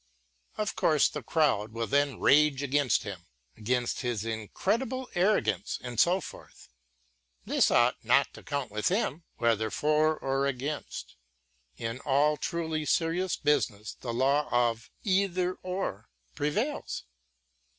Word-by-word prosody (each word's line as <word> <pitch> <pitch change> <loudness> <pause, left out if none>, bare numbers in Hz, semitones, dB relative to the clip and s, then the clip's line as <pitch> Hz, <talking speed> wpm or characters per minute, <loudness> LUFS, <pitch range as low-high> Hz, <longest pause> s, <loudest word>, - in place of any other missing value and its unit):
Of 210 -1 -2
course 155 -3 +4
the 150 - -6
crowd 115 -6 +1
will 115 0 -2
then 140 +2 +1
rage 145 -1 +4
against 140 -1 +2
him, 95 -5 -8 0.3
against 120 +2 -1
his 120 -5 -2
incredible 220 - -2
arrogance 115 - +1
and 120 -2 -5
so 180 +2 +4
forth. - - -12 0.8
This - - +3
ought - - +3
not - - +3
to - - -11
count 140 -6 -3
with 105 0 -1
him, 175 - -1
whether 110 -2 +1
for 155 +4 +2
or 135 +1 0
against. 140 - -5 0.6
Tn 115 +2 -4
all 145 +2 +3
truly 160 0 -2
serious 170 +4 +1
business 110 -8 0
the 120 - -6
law 135 +5 +2
of: 120 -1 +1 0.2
eitherŌĆöor, 185 -1 -1 0.3
prevails. 210 - -2
145 Hz, 125 wpm, -29 LUFS, 120-170 Hz, 0.8 s, course